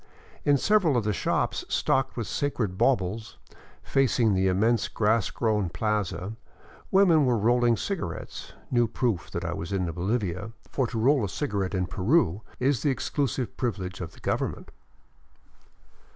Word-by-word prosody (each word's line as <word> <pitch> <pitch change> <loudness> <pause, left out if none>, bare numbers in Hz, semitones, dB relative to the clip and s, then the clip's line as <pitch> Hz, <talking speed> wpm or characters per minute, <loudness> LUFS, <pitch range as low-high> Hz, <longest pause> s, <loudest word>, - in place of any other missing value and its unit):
In 145 -1 +5
several 175 -5 +3
of 115 - +1
the 105 0 0
shops 85 - 0
stocked 135 -1 +1
with 115 - -2
sacred 110 -4 -2
baubles, 110 -2 0 0.5
facing 125 -5 +2
the 95 0 +2
immense 110 +5 +2
grass 110 0 +1
grown 105 -5 0
plaza, 105 +1 -2 0.6
women 185 -6 +5
were 120 -2 +3
rolling 120 +2 +3
cigarettes, 170 - -5 0.2
new 120 -1 +3
proof 110 -6 -1
that - - -4
I - - -2
was 85 +3 -5
in 95 -2 0
Bolivia, 95 +2 -2 0.2
for 130 -3 0
to 115 - -5
roll 130 +3 +3
a 100 - -1
cigarette 100 -7 -2
in 90 -1 0
Peru 100 - +1 0.2
is 130 -2 +1
the 145 - +2
exclusive 130 -2 -1
privilege 100 -6 -3
of 85 -2 -6
the - - -16
government. - - -2
110 Hz, 150 wpm, -27 LUFS, 95-130 Hz, 0.6 s, In